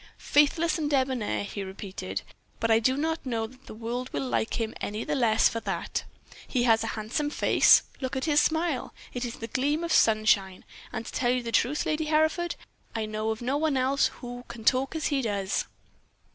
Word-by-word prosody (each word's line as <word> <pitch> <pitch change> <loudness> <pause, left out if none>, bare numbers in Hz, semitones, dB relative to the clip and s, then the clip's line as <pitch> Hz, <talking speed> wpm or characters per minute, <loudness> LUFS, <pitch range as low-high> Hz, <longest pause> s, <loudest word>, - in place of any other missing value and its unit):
"'Faithless 315 +3 +2
and 300 -2 -1
debonair,' 260 -7 0
he 200 0 -5
repeated. 190 0 -5 0.4
'But 230 - +1
I 225 - +6
do 260 +4 +2
not 320 +2 -1
know 230 -4 -1
that 255 +4 -15
the - - -9
world 240 +3 -4
will 140 -2 -2
like 115 - -1
him 225 -1 -2
any 210 +2 -3
the - - -2
less 230 -5 +4
for 230 - -2
that. 195 -6 -3 0.4
He 250 -3 0
has 225 -2 +4
a - - -2
handsome 225 +8 -1
face. - - +5 0.2
Look 260 -1 -3
at 265 - -1
his 295 -2 +4
smile; 320 -4 0 0.2
it 245 0 -2
is 235 - -5
like - - -12
a - - -2
gleam 290 +7 0
of 335 - -2
sunshine. 215 -4 +3 0.3
And, 225 - -4
to - - -7
tell 245 - 0
you 250 0 +1
the 230 - -4
truth, 260 +6 +1
Lady 310 0 0
Hereford, 315 +3 +1 0.4
I 220 -1 -1
know 215 +1 -2
of 220 +2 -3
no 265 +4 0
one 300 -2 +1
else 265 +2 +3
who 245 -1 -7
can 235 -1 -9
talk 265 +5 +2
as 315 - -2
he 275 - +2
does.' 200 -4 -1
245 Hz, 210 wpm, -27 LUFS, 220-290 Hz, 0.4 s, I